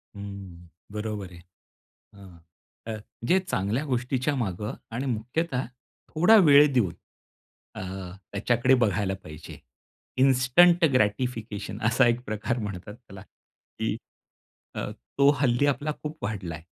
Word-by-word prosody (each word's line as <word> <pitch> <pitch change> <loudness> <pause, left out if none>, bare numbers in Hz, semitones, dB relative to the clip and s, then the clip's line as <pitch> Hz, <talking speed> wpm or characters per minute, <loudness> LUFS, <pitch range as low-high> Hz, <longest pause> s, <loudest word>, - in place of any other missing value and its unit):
हम्म. 100 -4 -9 0.2
बरोबर 105 -3 -4
आहे. 85 - -12 0.8
हां. 95 -4 -14 0.5
अ, 110 -1 -3 0.3
जे 185 - +4
चांगल्या 125 - -1
गोष्टीच्या 130 +2 -1
मागं 105 0 -3 0.2
आणि 125 +4 -2
मुख्यतः 125 +4 -2 0.4
थोडा 180 +8 +5
वेळ 145 0 +7
देऊन 100 -9 +2 0.8
अ, - - -5 0.5
त्याच्याकडे 120 +5 +2
बघायला 100 -2 0
पाहिजे. 75 +1 -10 0.6
इन्स्टंट 135 +7 +5
ग्रॅटिफिकेशन 110 -1 -1
असा 125 +3 +4
एक 120 0 +2
प्रकार 110 +3 -2
म्हणतात 105 -1 -6
त्याला 100 -6 -13
की - - -7 0.8
अ, - - -3 0.3
तो 140 0 +6
हल्ली 125 0 +3
आपला 145 +2 0
खूप 155 -3 -6
वाढलाय. 90 -7 -5
115 Hz, 115 wpm, -26 LUFS, 100-135 Hz, 0.8 s, वेळ